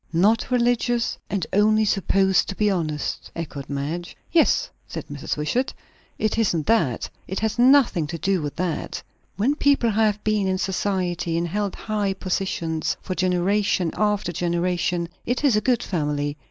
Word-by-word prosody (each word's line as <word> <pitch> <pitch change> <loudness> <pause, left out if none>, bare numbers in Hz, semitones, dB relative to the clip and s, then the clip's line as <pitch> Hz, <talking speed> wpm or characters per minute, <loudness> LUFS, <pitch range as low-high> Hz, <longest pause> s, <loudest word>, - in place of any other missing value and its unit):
"Not 205 +10 +3
religious, 240 -1 +1
and 195 -5 -1
only 215 +2 +4
supposed 195 -2 +2
to 195 - -4
be 210 0 +2
honest!" 155 -5 -2
echoed 150 -4 -6
Madge. 150 +5 -4
"Yes," 330 -1 +3 0.2
said - - -6
Mrs. - - -3
Wishart. 240 - -1 0.4
"It 215 +1 0
isn't 170 -9 +1
that. 165 - +1 0.2
It 190 - -3
has 220 +1 -1
nothing 250 - +5
to 165 +2 -4
do 190 +1 0
with 145 -1 -4
that. 175 -3 -3 0.3
When 235 +8 +2
people 280 -5 +3
have 210 -1 +1
been 215 -2 +1
in 190 0 +1
society, 180 -3 -1
and 170 +1 0
held 205 +1 -2
high 210 -3 -1
positions 180 -4 -2
for 185 - -4
generation 185 0 +1
after 210 -4 0
generation, 175 0 0 0.2
it 245 +3 -1
is 275 -6 +4
a 210 - +2
good 245 -1 +1
family. 145 -4 -1
190 Hz, 155 wpm, -23 LUFS, 170-215 Hz, 0.4 s, nothing